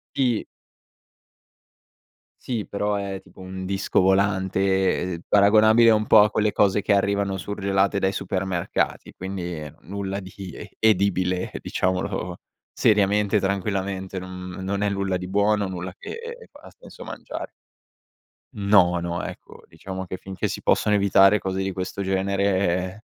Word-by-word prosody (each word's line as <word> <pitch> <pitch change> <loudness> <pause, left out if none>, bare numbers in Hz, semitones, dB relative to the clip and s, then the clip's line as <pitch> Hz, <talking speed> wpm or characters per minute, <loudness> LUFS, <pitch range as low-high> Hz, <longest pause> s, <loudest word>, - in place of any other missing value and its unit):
Sì. 125 -5 +1 2.0
Sì, 115 -5 -3
però, 105 +1 -1
è 100 -1 -3
tipo - - -18
un 95 0 -6
disco 95 0 +1
volante, 95 0 +2
ehm, 85 - -4
paragonabile 110 +3 +6
un 110 -1 +2
po' 105 - +8
a 105 - +3
quelle 105 -1 +1
cose 100 0 +3
che 100 - +2
arrivano 100 0 +1
surgelate 100 +1 0
dai 95 0 +1
supermercati, 95 -3 -2
quindi, 90 -5 -5
nulla 100 +4 -4
di 95 -1 -11 0.2
e 105 - -9
edibile, 95 -3 +2
diciamolo 90 -1 -2 0.3
seriamente, 105 0 +3
tranquillamente, 95 -1 -2
non 90 0 -7
non 100 +1 -2
è 105 - +1
nulla 100 -2 -1
di 90 0 -6
buono, 100 0 +2
nulla 90 0 -5
che - - -8
e 470 +1 -8
f - - -61
ha - - -12
senso - - -13
mangiare. - - -7 1.1
No, 100 -4 +4
no, 85 0 -3
ecco, - - -9
diciamo 95 -1 -7
che 95 - -5
finché 95 +1 -4
si - - -5
possono 105 -1 +2
evitare 100 +1 +5
cose 95 0 -3
di 95 - -1
questo 95 +2 -4
genere, 95 0 0
95 Hz, 140 wpm, -24 LUFS, 95-100 Hz, 2.0 s, po